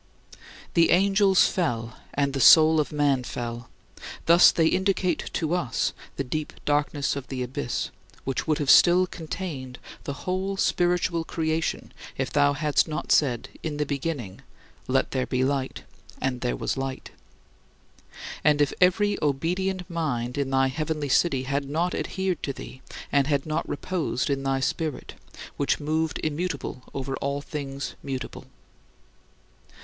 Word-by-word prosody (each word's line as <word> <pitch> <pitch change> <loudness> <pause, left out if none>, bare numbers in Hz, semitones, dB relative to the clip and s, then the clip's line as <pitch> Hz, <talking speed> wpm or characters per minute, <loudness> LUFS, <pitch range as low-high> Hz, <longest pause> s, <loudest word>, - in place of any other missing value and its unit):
The 170 -1 +4
angels 195 +1 +5
fell, 120 -10 -2 0.2
and 140 -1 +1
the 135 - -2
soul 160 +3 +8
of 150 - 0
man 145 -3 +2
fell; 120 -1 -5 0.6
thus 170 +1 +8
they 165 - +2
indicate 190 +1 +1
to 160 0 -1
us 130 -10 0 0.2
the 140 - -2
deep 150 +4 -4
darkness 145 -1 +1
of 140 -1 -6
the 130 -2 -3
abyss, 125 0 -3 0.3
which 135 +3 -2
would 155 -1 +2
have 145 -3 +3
still 180 +1 +7
contained 155 -7 -6 0.3
the 140 -1 -6
whole 190 +2 -1
spiritual 175 -2 +1
creation 160 0 -2 0.2
if - - -2
thou 145 0 +4
hadst 150 0 +1
not 155 -1 -4
said, 125 -6 +2
in 155 -2 -4
the 150 - 0
beginning, 140 - -4 0.5
"Let - - +1
there 130 -1 -1
be 130 0 0
light: 135 -1 -1 0.4
and 125 -2 -2
there 125 - 0
was - - -2
light" 135 -1 -4 1.3
and 150 0 +4
if 145 -2 +2
every 205 +3 +3
obedient 180 +6 -1
mind 140 -9 -2
in 140 -2 -1
thy 135 0 +3
heavenly 155 +1 -2
city 135 -2 +2
had 140 +1 -2
not 170 +5 0
adhered 190 -2 -2
to 140 - -2
thee 130 - -10 0.3
and 140 -1 +3
had 140 -2 +1
not 155 -1 -2
reposed 150 -5 -2
in 135 -1 0
thy 135 0 0
Spirit, 155 +2 -2 0.4
which 140 - +1
moved 155 +2 -1
immutable 150 -4 -3
over 135 0 -3
all 140 +1 -2
things 140 -2 -5
mutable. 135 -2 -6
145 Hz, 145 wpm, -26 LUFS, 135-165 Hz, 1.3 s, soul